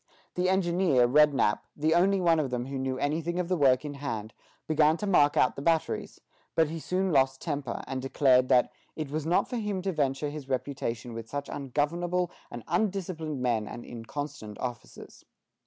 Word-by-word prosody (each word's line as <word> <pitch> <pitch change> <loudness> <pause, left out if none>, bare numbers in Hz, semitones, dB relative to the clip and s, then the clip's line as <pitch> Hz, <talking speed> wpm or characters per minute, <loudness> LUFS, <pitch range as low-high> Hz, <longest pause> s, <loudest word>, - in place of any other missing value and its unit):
The 180 +1 +1
engineer, 175 -8 +3
Rednap, 140 -6 +4 0.2
the 155 +2 +2
only 190 +3 +3
one 170 -3 +3
of 145 -4 -1
them 125 -1 -2
who 135 0 -4
knew 130 0 -2
anything 160 +5 -1
of 180 -1 -2
the 185 - +2
work 135 -3 +3
in 145 - -4
hand, 115 -7 -5 0.3
began 155 0 +3
to 210 - -4
mark 150 -7 +4
out 125 - +3
the - - -6
batteries; 165 +1 0 0.4
but 160 -2 +3
he 165 - -4
soon 185 +3 -1
lost 135 -2 +3
temper, 140 -5 -4
and 130 0 -4
declared 130 -1 +3
that 125 -1 +4 0.2
"it 155 -3 -5
was 155 +1 -2
not 175 - +2
for 245 - -4
him 205 -4 -2
to 195 - 0
venture 145 -2 -1
his 145 -3 -8
reputation 125 -3 -3
with 115 0 -7
such 145 0 -4
ungovernable 170 +6 -1 0.2
and 120 -1 -8
undisciplined 180 - -2
men 115 -4 0
and 120 - -8
inconstant 115 -2 -7
officers." 125 -2 -7
145 Hz, 185 wpm, -28 LUFS, 130-170 Hz, 0.4 s, Rednap